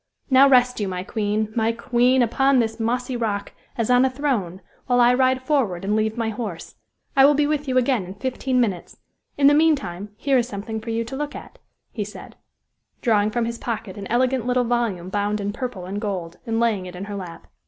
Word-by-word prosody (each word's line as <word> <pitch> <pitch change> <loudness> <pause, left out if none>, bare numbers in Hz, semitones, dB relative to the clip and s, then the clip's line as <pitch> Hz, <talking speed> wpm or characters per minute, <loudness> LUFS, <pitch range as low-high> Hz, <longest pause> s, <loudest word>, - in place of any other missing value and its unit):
Now, 270 +1 +7
rest 250 -2 +4
you, 205 - -1
my 180 -1 -4
queen! 215 +1 -2
my 225 0 +2
queen! 245 +2 +2
upon 270 +4 +2
this 225 -1 0
mossy 245 +3 -1
rock, 210 -4 -2 0.3
as 230 +1 0
on 250 +1 +5
a 265 - +3
throne, 245 -10 -2 0.3
while 245 -1 +3
I 240 0 +6
ride 260 0 +2
forward 240 - 0
and 205 +2 +1
leave 220 +1 0
my 230 -1 -1
horse. 210 -7 -6 0.4
I 270 - +6
will 290 +1 +6
be 295 +1 +2
with 295 -1 -1
you 255 -1 +1
again 250 -5 +2
in 185 +2 -9
fifteen 260 +2 -1
minutes; 200 -8 -2 0.4
in 280 - +3
the 285 - +7
meantime 275 - +1
here 270 0 +2
is 240 - -1
something 220 0 -5
for 230 - -8
you 230 0 -1
to 230 +4 -7
look 295 +1 -4
at," - - -11 0.3
he 215 - -3
said, 210 +3 -10 0.7
drawing 210 -3 +3
from 235 +1 -1
his 235 0 -4
pocket 220 -4 -4
an 200 -1 -7
elegant 250 0 +1
little 250 0 +2
volume 230 -7 -1
bound 205 +1 -1
in 205 0 -3
purple 240 -6 -5
and 200 +3 -4
gold, 180 -6 -4
and 225 0 0
laying 215 -6 0
it 180 - -9
in 180 - -6
her 205 0 -6
lap. 180 -4 -8
230 Hz, 215 wpm, -23 LUFS, 205-255 Hz, 0.7 s, Now